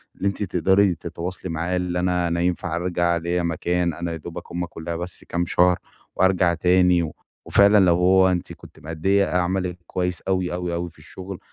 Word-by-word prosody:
اللي 100 - -2
أنتِ 100 +1 -2
تقدري 95 +1 +2
تتواصلي 85 +2 -6
معاه 85 +3 -2
اللي 90 -1 -2
أنا 90 -1 +1
أنا 85 0 -1
ينفع 90 -1 -1
أرجع، 85 -1 0
ليّا 85 +1 -1
مكان؟ 85 +1 0
أنا 85 +2 -4
يا 80 - -4
دوبك 85 +2 -9
هُم 90 +1 -2
كلّها 85 0 -6
بس 90 +1 -4
كام 85 0 0
شهر 90 +1 +3 0.4
وأرجع 95 -2 +3
تاني، 90 -1 +3 0.3
وفعلًا 100 +1 +5
لو 85 -1 +4
هو 95 +1 +4
أنتِ 90 -1 -3
كنتِ - - -15
مأدّية 95 +6 +1
أ 90 - -1
عملِك 90 0 -1
كويس 90 -2 -2
أوي، 95 -2 -1
أوي، 90 -1 -3
أوي، 85 +1 -3
في 75 - -22
الشغل 95 +4 -9
90 Hz, 185 wpm, -23 LUFS, 85-90 Hz, 0.4 s, وفعلًا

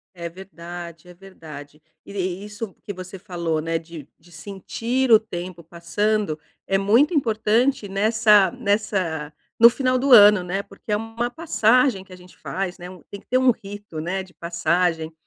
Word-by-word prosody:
É 170 -1 -5
verdade, 175 -2 -10
é 180 - -13
verdade. 155 -6 -12 0.2
E - - -11 0.3
isso 210 -1 -7
que - - -6
você 185 +1 -9
falou, 170 -5 -3
né. 165 +1 -2
De 160 -3 -11
de 175 +2 -22
sentir 225 +9 -3
o 220 - +9
tempo 175 -4 -8
passando 175 +2 -1 0.3
é 195 - +2
muito 230 - +3
importante 230 -2 +1
nessa 210 0 +4
nessa 200 -10 -2 0.3
no 235 - +10
final 255 +1 0
do 270 +1 0
ano, 210 -4 +8
né. 180 +3 -2
Porque 200 +2 -11
é 210 - +2
uma 225 +2 -4
passagem 250 - +2
que 190 - -22
a - - -9
gente 180 0 -18
faz, 190 -1 -4
né. 175 -1 -9 0.2
Tem 200 - -9
que - - -34
ter 255 - +2
um 260 -1 +4
rito, 205 -6 -9
né, 185 +4 -2
de 185 - -18
passagem, 170 -1 -1
195 Hz, 170 wpm, -22 LUFS, 170-220 Hz, 0.3 s, no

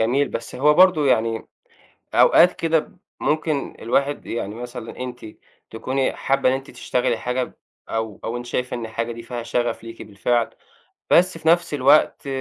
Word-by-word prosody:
جميل، 130 +6 +2
بس 115 - -6
هو 150 +3 +4
برضه 175 -4 +5
يعني 115 -2 +1 0.7
أوقات 180 - +6
كده 165 -1 +1
ب - - -12 0.2
ممكن 150 -2 -1
الواحد 140 +5 0
يعني 105 -3 -4
مثلًا 120 -1 -8
أنتِ 125 -2 -6 0.4
تكوني 130 +4 -1
حابّة 135 -1 +1
إن 130 - +2
أنتِ 135 0 -5
تشتغلي 125 -2 -1
حاجة 125 +1 -1
ب - - -9 0.4
أو 110 -3 -3
أو 120 +2 -3
أنتِ 120 - -7
شايفة 125 +1 -2
إن 115 - -5
الحاجة 115 +1 -3
دي 115 0 -8
فيها 120 -1 -6
شغف 120 0 -2
ليكِ 115 0 -9
بالفعل، 115 +3 0 0.6
بس 180 -1 +4
في 160 - -7
نفْس 170 -1 +3
الوقت 145 +2 +3
125 Hz, 170 wpm, -22 LUFS, 115-145 Hz, 0.7 s, أوقات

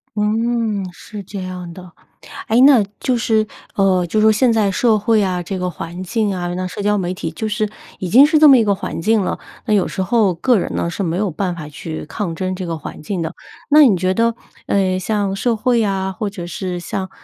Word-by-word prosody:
嗯， 220 0 0
是 210 +3 -9
这 195 +1 -7
样 180 -1 -6
的。 180 0 -12 0.6
诶， 230 +3 +4
那 265 -5 +7 0.2
就 255 -2 0
是， 220 -2 +1 0.3
呃， 190 -2 +2
就 195 +6 -1
是 - - +3
说 220 - +6
现 235 +3 +3
在 215 -3 +2
社 220 +3 +2
会 215 0 +2
啊 180 -2 -1
这 190 +2 -5
个 180 0 -2
环 175 +1 -7
境 210 +2 -1
啊， 175 -1 -3
那 185 +1 -3
社 180 +3 -6
交 210 0 +2
媒 180 -2 -2
体 165 -3 -5
就 215 +7 -4
是 215 0 -1 0.3
已 185 - -4
经 255 +9 +8
是 310 +1 +3
这 305 0 +7
么 275 -2 +8
一 230 - +3
个 205 -2 +2
环 190 - -5
境 220 +4 +2
了， - - -3 0.3
那 215 - +1
有 200 -3 +2
时 190 - -3
候 205 -3 +2
个 245 +8 +2
人 - - -3
呢 170 - -1
是 175 - -5
没 170 -2 -1
有 200 -1 0
办 180 +2 -2
法 155 -3 -7
去 155 +2 -7
抗 175 0 -4
争 185 +2 -2
这 185 0 -5
个 165 -1 -3
环 - - -9
境 180 +3 -3
的。 160 - -4 0.4
那 300 +1 +8
你 210 -8 +4
觉 185 +1 0
得， 230 +3 +1 0.3
呃， 185 -2 +1
像 200 0 -1
社 230 +4 0
会 235 +1 +1
啊， 190 -2 -1
或 210 +2 -3
者 190 -4 -7
是 180 +1 -4
像， 185 +2 -4
195 Hz, 255 characters per minute, -18 LUFS, 180-220 Hz, 0.6 s, 经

